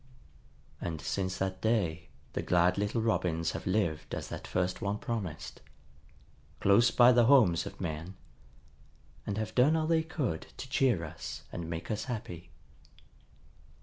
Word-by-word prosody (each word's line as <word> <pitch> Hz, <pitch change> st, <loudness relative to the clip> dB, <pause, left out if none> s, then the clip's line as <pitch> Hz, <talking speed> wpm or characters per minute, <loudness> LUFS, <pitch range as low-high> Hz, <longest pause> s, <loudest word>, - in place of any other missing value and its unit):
And 80 Hz, -3 st, -3 dB
since 95 Hz, +2 st, -2 dB
that 95 Hz, 0 st, -2 dB
day 95 Hz, -8 st, 0 dB, 0.2 s
the -, -, -1 dB
glad 90 Hz, +1 st, +3 dB
little 105 Hz, +3 st, 0 dB
Robins 85 Hz, -7 st, 0 dB
have 85 Hz, -, -6 dB
lived 90 Hz, -6 st, 0 dB
as -, -, -6 dB
that -, -, -7 dB
first 90 Hz, +2 st, -1 dB
one 100 Hz, -1 st, -1 dB
promised, 110 Hz, -, -5 dB, 1.0 s
close 100 Hz, +5 st, +5 dB
by 120 Hz, 0 st, +6 dB
the 120 Hz, -1 st, +5 dB
homes 110 Hz, -11 st, +5 dB
of -, -, -10 dB
men, 85 Hz, +1 st, -4 dB, 1.1 s
and 100 Hz, -, -2 dB
have 110 Hz, 0 st, -3 dB
done 135 Hz, +6 st, +4 dB
all 160 Hz, -1 st, +1 dB
they 165 Hz, 0 st, +3 dB
could 150 Hz, -, -3 dB
to -, -, -6 dB
cheer 125 Hz, -, +2 dB
us 75 Hz, -2 st, -7 dB
and 85 Hz, -2 st, -5 dB
make 85 Hz, +3 st, -4 dB
us 105 Hz, 0 st, -2 dB
happy. 90 Hz, -8 st, -6 dB
95 Hz, 150 wpm, -31 LUFS, 85-115 Hz, 1.1 s, by